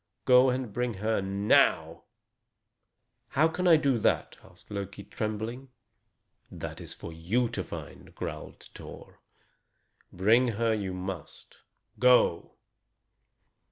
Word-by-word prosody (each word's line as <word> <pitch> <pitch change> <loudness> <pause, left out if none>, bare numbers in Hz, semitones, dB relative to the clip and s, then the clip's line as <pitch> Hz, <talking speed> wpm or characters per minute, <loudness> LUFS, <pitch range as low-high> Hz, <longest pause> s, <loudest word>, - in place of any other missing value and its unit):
"Go 125 +1 +6
and 125 -4 -3
bring 120 -1 -2
her 110 +1 -1
now." 100 +2 +2 1.2
"How 155 +4 +3
can 180 +3 -2
I 170 - +8
do 140 -5 +1
that?" - - 0
asked 90 +2 -19
Loki, 100 0 -6
trembling. 110 +6 -5 0.8
"That - - -7
is - - -8
for 85 - -9
you 105 +10 0
to 105 -5 -4
find," - - -10
growled - - -7
Thor. - - -12 0.9
"Bring 110 +7 +3
her 115 -1 +2
you 100 -4 -3
must. 90 -3 -8 0.4
Go!" 125 -7 +3
110 Hz, 115 wpm, -28 LUFS, 95-125 Hz, 1.2 s, I